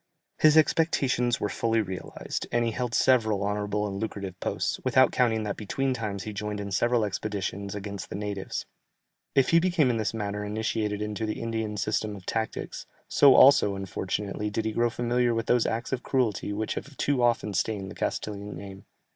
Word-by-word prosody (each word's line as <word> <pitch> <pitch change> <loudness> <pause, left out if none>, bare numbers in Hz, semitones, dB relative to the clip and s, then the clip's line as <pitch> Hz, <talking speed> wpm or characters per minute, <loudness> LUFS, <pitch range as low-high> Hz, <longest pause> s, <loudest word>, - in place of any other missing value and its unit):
His 155 0 +6
expectations 135 -6 +2
were - - 0
fully 115 +2 0
realized, 95 -4 -4
and 120 0 +2
he 115 - 0
held 120 0 -2
several 110 -6 +3
honourable 105 0 -1
and 100 -1 -4
lucrative 100 -4 -5
posts, - - -2
without 130 0 +4
counting 115 -3 +2
that 105 -2 -3
between 130 +5 -1
times 105 -5 -4
he 110 - -6
joined 105 0 -4
in 100 -1 -5
several 120 +3 +2
expeditions 100 -1 -3
against 100 -1 -6
the - - -5
natives. 100 -1 -4 0.7
If 135 -2 +4
he 165 - +6
became 170 -7 +2
in 115 - -1
this 110 -1 0
manner 105 -1 -3
initiated 105 0 -2
into 105 +1 -3
the 110 - -3
Indian 110 -2 -3
system 105 +1 -1
of 95 -3 -12
tactics, 110 -1 -3 0.2
so 140 -2 +6
also, 115 -7 +7
unfortunately, 100 +2 -3
did 110 +1 -2
he 110 - 0
grow 120 +2 +2
familiar 120 0 +1
with 115 0 -1
those 120 -1 +3
acts 115 +1 -3
of 125 - -1
cruelty 120 -8 0
which 105 +1 -2
have 140 -1 -7
too 140 -3 +1
often 120 -3 +2
stained 100 0 -1
the - - -9
Castilian 100 -2 -4
name. 95 +1 -10
110 Hz, 185 wpm, -27 LUFS, 100-120 Hz, 0.7 s, also